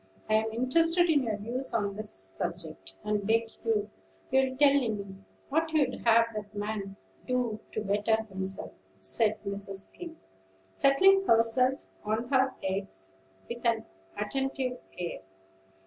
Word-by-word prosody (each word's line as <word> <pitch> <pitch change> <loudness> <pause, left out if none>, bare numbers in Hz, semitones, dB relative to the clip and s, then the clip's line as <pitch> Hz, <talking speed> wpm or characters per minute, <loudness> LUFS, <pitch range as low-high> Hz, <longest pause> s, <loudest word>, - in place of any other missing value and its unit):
I'm 220 +1 +2
interested 330 +9 +3
in 290 -3 +4
your 220 -4 -1
views 240 +6 -4
on 200 -3 0
this 215 +1 -4
subject, 95 0 -4
and 210 -1 0
beg 225 0 +2
you'll 215 -2 0 0.7
tell 285 0 +6
me 210 -8 -1 0.3
what 320 +3 +1
you'd 280 -5 +3
have 230 0 +7
that 210 -1 -7
man 205 -1 -4 0.3
do 245 -4 0
to 215 - -3
better 210 +2 +1
himself," 190 -2 -3 0.3
said 210 - +2
Mrs. 200 0 -3
Skim, 335 -2 -9 0.6
settling 385 - +5
herself 230 +4 +3 0.2
on 220 +3 -1
her 265 -1 +3
eggs 190 - -3 0.3
with 235 0 -6
an 230 -2 +1 0.3
attentive 260 +3 -2 0.2
air. 175 -1 -4
225 Hz, 130 wpm, -29 LUFS, 205-260 Hz, 0.7 s, have